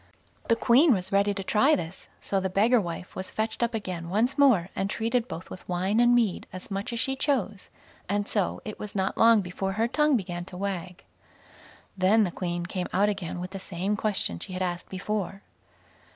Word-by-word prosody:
The 230 - +4
Queen 250 +4 +5
was 185 -1 -3
ready 200 +1 +3
to 195 -1 -4
try 265 +10 +4
this; 165 - -6
so 195 - -1
the 190 0 -1
beggar 220 +5 +4
wife 175 0 -6
was 190 - -3
fetched 220 +1 -3
up 235 -1 +1
again 180 -5 -4
once 220 +7 +1
more, 250 - +4
and 195 - -1
treated 230 +3 0
both 170 -4 -8
with 185 - -10
wine 185 +5 +1
and 240 0 +5
mead 225 -7 +1
as 185 +2 -8
much 195 +4 -3
as 235 - -3
she 265 +3 0
chose; 255 -8 -1 0.4
and 205 +1 0
so 200 -4 0
it 215 - -7
was 210 -1 -6
not 190 -1 0
long 230 -2 +6
before 190 +1 -3
her 225 +3 +1
tongue 300 +2 +3
began 175 -4 -4
to 180 - -10
wag. 185 -2 -4 0.9
Then 200 +4 +4
the 180 - -1
Queen 175 -1 -3
came 180 0 -3
out 200 +3 +3
again 185 -4 -4
with 180 +1 -5
the 195 - -6
same 190 +2 -2
question 205 - 0
she 185 - -5
had 185 +1 -2
asked 175 -1 -3
before. 195 0 -3
200 Hz, 205 wpm, -27 LUFS, 185-225 Hz, 0.9 s, long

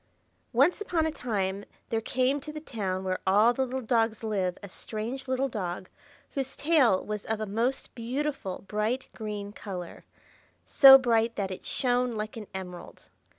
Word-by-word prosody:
ONCE 280 - +3
upon 340 -6 0
a 320 - 0
time 200 -8 -2 0.3
there 225 -1 0
came 260 +4 +1
to 300 +2 -8
the 305 - -6
town 195 -10 -3
where 185 -1 -1
all 210 +5 +5
the 265 - 0
little 260 +1 -3
dogs 225 -1 +1
live 195 -5 -1
a - - -6
strange 230 +7 -5
little 260 +1 +1
dog, 185 -6 -4 0.4
whose 270 -1 -4
tail 285 - +3
was 210 -1 -4
of 220 -1 -2
a 215 - -2
most 230 +6 -2
beautiful 250 -4 -3
bright 215 +6 -1
green 210 -2 -5
color,—so 205 - +3
bright 230 -3 +1
that 195 -2 -2
it 185 - -7
shone 245 -1 +1
like 215 0 -4
an 215 -3 -7
emerald. 180 -2 -9
225 Hz, 160 wpm, -28 LUFS, 200-260 Hz, 0.4 s, all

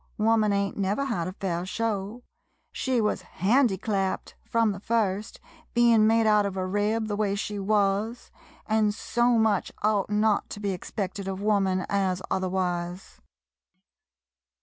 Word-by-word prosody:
Woman 215 -1 +3
ain't 200 0 -1
never 205 +7 0
had 190 -11 -2
a 185 - -5
fair 180 -3 -3
show 215 +3 -3 0.2
— - - -46
she 260 -2 0
was 210 -1 0
handiclapped 195 - 0
frum 230 -2 +1
the 195 - -6
first, 210 -1 -1 0.4
bein' 235 -2 +5
made 225 0 +3
out 210 -1 +4
of 195 -1 -3
a 185 - -1
rib, 210 +3 0
the 205 - -2
way 205 -1 0
she 205 0 -3
wuz, 205 +3 0 0.3
an' 215 -1 +2
so 240 +2 +1
much 220 -3 +1
ought 210 -2 +1
not 210 0 +1
to - - -7
be 200 -1 -1
expected 190 +1 -5
of 190 -1 -3
woman 195 -3 +1
as 190 -2 0
otherwise. 180 -1 -2
205 Hz, 150 wpm, -26 LUFS, 190-220 Hz, 0.4 s, bein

